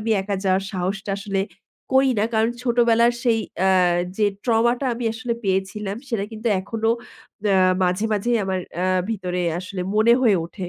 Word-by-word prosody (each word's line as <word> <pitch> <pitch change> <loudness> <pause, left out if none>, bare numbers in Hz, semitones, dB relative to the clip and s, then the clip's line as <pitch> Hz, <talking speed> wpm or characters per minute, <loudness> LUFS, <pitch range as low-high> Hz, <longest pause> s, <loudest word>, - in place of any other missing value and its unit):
আমি 225 +1 -2
একা 200 0 -2
যাওয়ার 190 0 +2
সাহসটা 195 +2 -3
আসলে 200 -1 -2 0.5
করি 265 0 +5
না। 210 - +2
কারণ 220 +1 +2
ছোটবেলার 235 -1 +3
সেই 235 -3 +2 0.3
আ - - +4 0.5
যে 215 - +3 0.2
trauma 235 0 +3
টা 275 - -1
আমি 235 +1 -5
আসলে 240 0 -3
পেয়েছিলাম 195 +1 -1
সেটা 225 -5 -1
কিন্তু 220 +2 -3
এখনো 225 +3 -1 0.6
আ - - +4 0.3
মাঝে, 180 +3 +1
মাঝেই 235 +4 +1
আমার 190 -1 -1 0.2
আ - - +1 0.3
ভিতরে 180 -4 -2 0.2
আসলে 185 +1 -6
মনে 220 +2 +5
হয়ে 225 -6 +4
ওঠে। 180 +1 -7
215 Hz, 170 wpm, -22 LUFS, 190-235 Hz, 0.6 s, করি